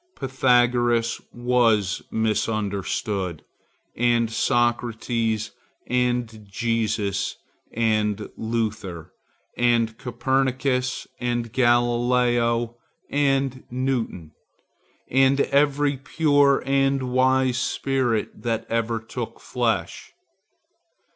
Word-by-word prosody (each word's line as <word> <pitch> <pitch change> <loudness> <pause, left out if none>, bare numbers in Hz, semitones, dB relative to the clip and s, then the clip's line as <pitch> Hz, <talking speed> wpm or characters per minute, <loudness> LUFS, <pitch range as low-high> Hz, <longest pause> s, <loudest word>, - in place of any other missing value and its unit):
Pythagoras 120 -3 +2
was 115 -5 +1
misunderstood, 105 -4 -1 0.5
and 120 -1 +2
Socrates, 115 -3 0 0.3
and 125 -3 -1
Jesus, 110 -2 -1 0.4
and 110 -2 0
Luther, 110 -7 -3 0.4
and 115 -2 +2
Copernicus, 130 +1 0
and 120 -2 -2
Galileo, 120 -1 +2 0.3
and 135 -2 +1
Newton, 125 - -2 0.8
and 135 +2 +3
every 140 0 +2
pure 145 -1 +2
and 135 -2 +1
wise 130 -1 +3
spirit 125 -4 -1
that 115 -1 -2
ever 115 0 0
took 110 - -7
flesh. - - -2
120 Hz, 70 wpm, -24 LUFS, 110-130 Hz, 0.8 s, and